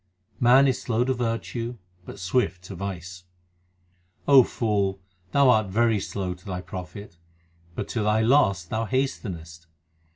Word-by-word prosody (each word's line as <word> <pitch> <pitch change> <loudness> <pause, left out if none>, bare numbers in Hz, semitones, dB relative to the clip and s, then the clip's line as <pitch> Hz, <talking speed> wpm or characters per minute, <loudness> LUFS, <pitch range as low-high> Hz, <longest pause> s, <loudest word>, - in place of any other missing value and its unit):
Man 130 +3 +6
is 130 - 0
slow 120 0 0
to 130 +1 0
virtue, 120 0 -3 0.3
but - - -9
swift 90 -1 -1
to 95 +1 -9
vice: 90 -1 -7 1.0
O 140 -2 +9
fool, 100 -5 -1 0.3
thou 140 -2 +5
art 110 -3 +2
very 110 +2 +2
slow 95 -1 -4
to 90 +1 -17
thy 90 -2 -5
profit, 90 0 -9 0.6
but - - -4
to 115 - -2
thy 105 +1 +2
loss 110 - +3
thou 110 +6 -2
hastenest. 85 -11 -3
105 Hz, 140 wpm, -25 LUFS, 90-120 Hz, 1.0 s, O